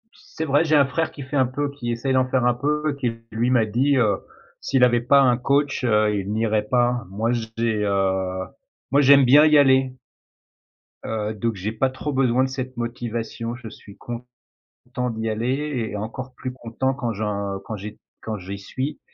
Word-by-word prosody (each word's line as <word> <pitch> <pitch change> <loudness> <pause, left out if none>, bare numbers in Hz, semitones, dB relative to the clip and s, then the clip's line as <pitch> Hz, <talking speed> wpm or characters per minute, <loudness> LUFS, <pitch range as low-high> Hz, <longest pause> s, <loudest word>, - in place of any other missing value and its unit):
C'est 160 - -7
vrai, 145 +2 +3
j'ai 155 -2 +2
un 140 -2 +6
frère 160 +4 -1
qui 140 - -8
fait 135 +3 -6
un 130 - +4
peu 140 +2 -3
qui 120 -4 -4
essaie 125 +3 -1
d'en 130 -1 +3
faire 130 -2 +1
un 125 - +4
peu, 150 +3 -1
qui 120 -3 0 0.2
lui 115 +3 0
m'a 120 -3 +3
dit, 130 +6 +1
heu, 105 -5 +3 0.4
s'il 135 -2 +2
avait 120 -1 +4
pas 140 +3 +5
un 125 -3 +4
coach, 140 +1 0
heu, 105 -2 +3
il 100 0 -3
n'irait 110 -1 +1
pas. 120 0 +1
Moi, 110 +5 -1
j'ai, 115 -2 -1
heu, 95 -2 0 0.5
moi 140 - +5
j'aime 140 -1 +7
bien 145 +5 +7
y 150 -1 +6
aller. 130 -2 +4 1.1
Heu, 110 -1 -2
donc 115 +1 -2
j'ai 100 +4 -3
pas 130 +4 +1
trop 140 +3 -5
besoin 130 -1 +2
de 130 - -1
cette 130 -1 -5
motivation, 120 0 -4
je 120 -3 -10
suis 100 -2 -14
content 125 +1 -9 0.7
d'y 110 0 -3
aller 125 +2 -2
et - - -5
encore 125 +5 -6
plus 130 - -5
content 130 +1 -2
quand 120 -4 -3
j'en 100 -2 -3
quand 110 - -5
j'ai 105 +1 -8 0.2
quand 110 -1 -4
j'y 95 +2 -7
suis 130 +9 -5
120 Hz, 195 wpm, -23 LUFS, 110-135 Hz, 1.1 s, j'aime